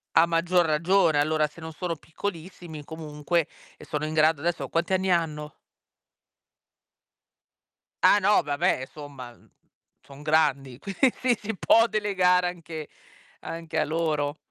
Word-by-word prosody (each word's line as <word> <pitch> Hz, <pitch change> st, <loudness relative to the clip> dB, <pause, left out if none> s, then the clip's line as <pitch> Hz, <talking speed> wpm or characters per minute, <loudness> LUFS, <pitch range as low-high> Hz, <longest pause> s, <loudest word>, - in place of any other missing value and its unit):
A 165 Hz, -, +7 dB
maggior 170 Hz, +1 st, +2 dB
ragione, 165 Hz, 0 st, +3 dB
allora, 155 Hz, +1 st, +2 dB
se 150 Hz, +3 st, -16 dB
non 160 Hz, 0 st, -7 dB
sono 170 Hz, 0 st, -3 dB
piccolissimi 165 Hz, -1 st, -7 dB
comunque, 155 Hz, +2 st, -2 dB, 0.4 s
ehm, -, -, -13 dB
sono 150 Hz, -1 st, -2 dB
in 155 Hz, -, -4 dB
grado 155 Hz, -1 st, +3 dB
adesso 170 Hz, +1 st, -2 dB
quanti 170 Hz, +3 st, -1 dB
anni 190 Hz, 0 st, +1 dB
hanno? 155 Hz, -3 st, -1 dB, 2.5 s
Ah 205 Hz, -, +6 dB
no, 205 Hz, +1 st, +3 dB
vabbè 145 Hz, -2 st, 0 dB
e 130 Hz, -, -6 dB
somma, 140 Hz, -5 st, -10 dB
mhmm, -, -, -24 dB, 0.5 s
son 140 Hz, 0 st, -14 dB
grandi, 145 Hz, -4 st, +1 dB
quindi 200 Hz, -, +1 dB, 0.3 s
si 220 Hz, +1 st, -4 dB
può 230 Hz, +4 st, +5 dB
delegare 185 Hz, -4 st, +2 dB
anche 165 Hz, -3 st, -7 dB, 0.5 s
anche 165 Hz, -1 st, -5 dB
a -, -, +2 dB
loro. 155 Hz, -2 st, -1 dB
160 Hz, 135 wpm, -26 LUFS, 150-180 Hz, 2.5 s, A